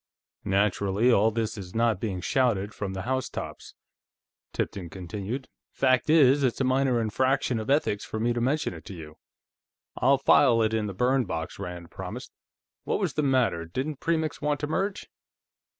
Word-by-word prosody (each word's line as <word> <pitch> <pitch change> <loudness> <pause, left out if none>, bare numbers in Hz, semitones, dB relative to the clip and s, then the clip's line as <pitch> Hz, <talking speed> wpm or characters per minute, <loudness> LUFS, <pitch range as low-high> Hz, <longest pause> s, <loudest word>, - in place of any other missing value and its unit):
"Naturally, 100 +3 +2
all 110 -1 +4
this 110 -1 -3
is 90 0 -9
not 115 -4 +2
being 95 -4 -3
shouted 110 -4 +1
from 100 -2 -4
the 95 0 -4
housetops," 130 +2 -4 0.8
Tipton 90 -4 -4
continued. 100 +9 -5 0.2
"Fact 130 +1 +2
is, 145 -3 +6
it's 130 -4 +1
a - - +2
minor 130 -1 +2
infraction 130 +2 +1
of 110 - -5
ethics 135 -8 +1
for 110 - -5
me 120 +2 +1
to 120 - -2
mention 140 -1 0
it 85 - -10
to 95 - -8
you." 80 -2 -11 0.8
"I'll 135 +3 +4
file 130 -3 +5
it 110 0 0
in 110 -1 0
the 100 - -6
burn 125 +4 +2
box," 80 -3 -5
Rand 90 -1 -7
promised. - - -7 0.5
"What - - -1
was - - -1
the 150 - 0
matter; 130 - +2
didn't 130 - -4
Premix 160 -2 -1
want 150 -1 0
to - - 0
merge?" 190 +6 -2
115 Hz, 170 wpm, -27 LUFS, 100-135 Hz, 0.8 s, is